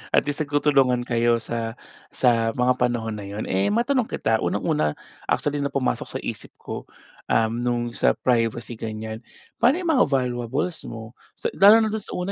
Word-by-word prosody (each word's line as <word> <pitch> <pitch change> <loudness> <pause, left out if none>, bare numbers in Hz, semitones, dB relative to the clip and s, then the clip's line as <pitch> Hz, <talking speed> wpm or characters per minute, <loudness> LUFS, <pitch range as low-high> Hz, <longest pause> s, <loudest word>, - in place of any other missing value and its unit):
at - - +5
least 145 +1 -4
nagtutulungan 135 -4 +3
kayo 120 -1 +1
sa 115 -1 -4 0.4
sa 115 -3 +2
mga 125 +1 +2
panahon 115 -3 -1
na 100 - -7
yun. 105 +2 -5
Eh, 95 +1 +2
matanong 240 +2 +1
kita, 110 0 0
unang-una 75 -1 0 0.3
actually 145 0 0
na 140 - 0
pumasok 135 -2 -1
sa - - -1
isip - - -6
ko, - - -7 0.4
um, 110 0 +2
nung 120 -1 -1
sa - - +2
privacy 120 -1 0
ganyan, 110 0 -5 0.4
paano 250 +5 +5
yung 330 - +2
mga 260 - +4
valuables 130 +4 -1
mo? 110 0 -8 0.2
Sa - - -3
lalo 215 +3 +7
na 215 - 0
dun 220 - -2
sa - - -8
una 180 +2 -2
120 Hz, 175 wpm, -24 LUFS, 115-145 Hz, 0.4 s, lalo